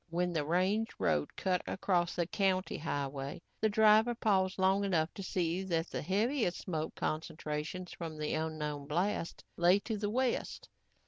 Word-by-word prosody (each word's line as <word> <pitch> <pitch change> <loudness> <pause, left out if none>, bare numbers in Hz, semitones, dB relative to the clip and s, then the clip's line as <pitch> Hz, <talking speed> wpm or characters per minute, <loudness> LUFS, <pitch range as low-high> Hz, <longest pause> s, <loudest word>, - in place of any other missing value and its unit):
When 175 +1 0
the 155 -3 0
range 185 +8 +1
road 75 -2 0
cut 185 -2 0
across 180 -3 0
the 175 - +1
county 185 +1 0
highway, 140 -2 -3 0.2
the 220 - +3
driver 220 +2 +5
paused 190 -5 +2
long 190 +1 +3
enough 170 -4 +1
to - - -7
see 180 -1 -1
that 165 -2 -1
the - - -2
heaviest 210 - +1
smoke 160 -4 -3
concentrations 155 +2 -3
from 165 -2 -6
the 150 0 -2
unknown 150 -2 -3
blast 170 +2 -1
lay 175 +3 +5
to 220 -1 -3
the 205 0 -1
west. 250 +2 -1
180 Hz, 155 wpm, -33 LUFS, 160-200 Hz, 0.2 s, driver